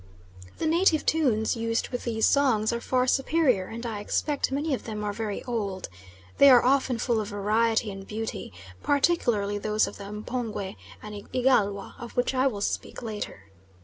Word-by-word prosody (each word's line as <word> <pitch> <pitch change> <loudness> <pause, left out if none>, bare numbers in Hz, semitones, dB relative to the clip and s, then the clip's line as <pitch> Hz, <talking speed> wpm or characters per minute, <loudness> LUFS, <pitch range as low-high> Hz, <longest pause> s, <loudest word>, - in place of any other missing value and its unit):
The - - -2
native 325 0 +3
tunes 250 -10 +2
used 230 0 -1
with 245 - -5
these 225 -2 +1
songs 235 -6 +3
are 235 - -3
far 255 0 +1
superior, 265 - +2
and 230 +2 -7
I 220 -3 -3
expect 280 +7 -1
many 290 +2 -1
of 260 - -3
them 215 -2 -4
are 205 0 -2
very 210 -1 -4
old. 205 -6 -3 0.5
They 280 - +9
are 250 -2 +7
often 260 -2 +2
full 230 -1 0
of 210 - -5
variety 215 +2 +1
and 195 0 -9
beauty, 220 - -5 0.3
particularly 240 -9 +1
those 215 +1 +1
of - - -8
the 200 0 -8
M'pongwe 210 -2 -4 0.3
and 210 -1 -9
Igalwa, 215 -6 +1
of 235 0 -9
which 245 +2 +1
I 260 +1 +3
will 210 -6 -3
speak - - -3
later. 205 - -6
230 Hz, 175 wpm, -27 LUFS, 210-260 Hz, 0.5 s, They